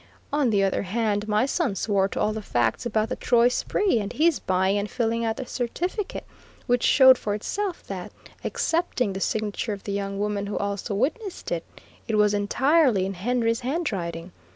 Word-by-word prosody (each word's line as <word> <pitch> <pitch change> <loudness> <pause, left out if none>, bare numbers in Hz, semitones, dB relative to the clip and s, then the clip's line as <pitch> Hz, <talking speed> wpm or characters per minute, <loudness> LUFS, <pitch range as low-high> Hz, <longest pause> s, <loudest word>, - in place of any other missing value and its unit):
On 290 -4 +2
the 200 -3 +2
other 195 - +1
hand, 210 +1 -1
my 215 +3 +2
son 275 - 0
swore 195 -1 +1
to - - -5
all 215 - +1
the 220 - -4
facts 120 - 0
about 215 -1 0
the - - -2
Troy 240 0 +3
spree, 370 - +1
and 200 -1 -4
his 325 0 +2
buying 190 +2 +1
and 205 +1 -3
filling 230 -1 -1
out 225 -1 -1
the 260 - -4
certificate, 350 - -3 0.4
which 245 0 +2
showed 260 -2 +7
for 205 -1 -2
itself 380 - -3
that, 185 -2 -6 0.3
excepting 320 - 0
the 190 - -4
signature 215 +1 -1
of 200 - -8
the 200 - -4
young 200 0 -3
woman 205 0 -1
who 205 - -3
also 200 +1 -2
witnessed 350 - -2
it, 170 -1 -1 0.4
it 220 - 0
was 210 -1 +4
entirely 245 - +3
in 195 - -3
Henry's 230 +4 0
handwriting. 195 - -3
215 Hz, 185 wpm, -25 LUFS, 200-255 Hz, 0.4 s, showed